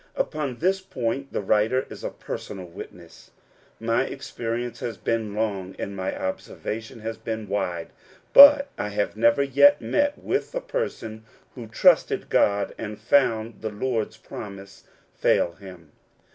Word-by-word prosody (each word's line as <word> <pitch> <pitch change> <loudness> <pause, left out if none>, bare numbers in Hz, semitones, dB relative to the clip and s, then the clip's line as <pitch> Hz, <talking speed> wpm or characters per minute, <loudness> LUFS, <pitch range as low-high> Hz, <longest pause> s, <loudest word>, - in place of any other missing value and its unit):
Upon 150 - -2
this 190 +5 +1
point 135 -5 -3
the - - -2
writer 110 +6 +2
is - - -9
a - - -2
personal 95 -3 -7
witness. 85 -1 -12 0.5
My 115 +1 +1
experience 120 -3 -5
has 115 -4 -4
been 110 0 -2
long, 100 -4 -2
and 100 - -5
my 95 -1 -3
observation 110 +4 -5
has 115 +1 -4
been 110 -1 -4
wide; 90 -4 -2 0.4
but 280 0 +10
I - - -1
have 105 0 -2
never 115 +5 +4
yet 140 +2 +5
met 285 - 0
with 415 +5 -2
a - - +1
person 115 - -4 0.3
who 120 -4 -9
trusted 110 - +3
God, 100 0 +2
and 105 -1 -5
found 115 -1 +1
the 110 - -2
Lord's 110 +1 -2
promise 100 -1 -10 0.3
fail 85 - +2
him. 85 -4 -13
110 Hz, 145 wpm, -25 LUFS, 100-130 Hz, 0.5 s, but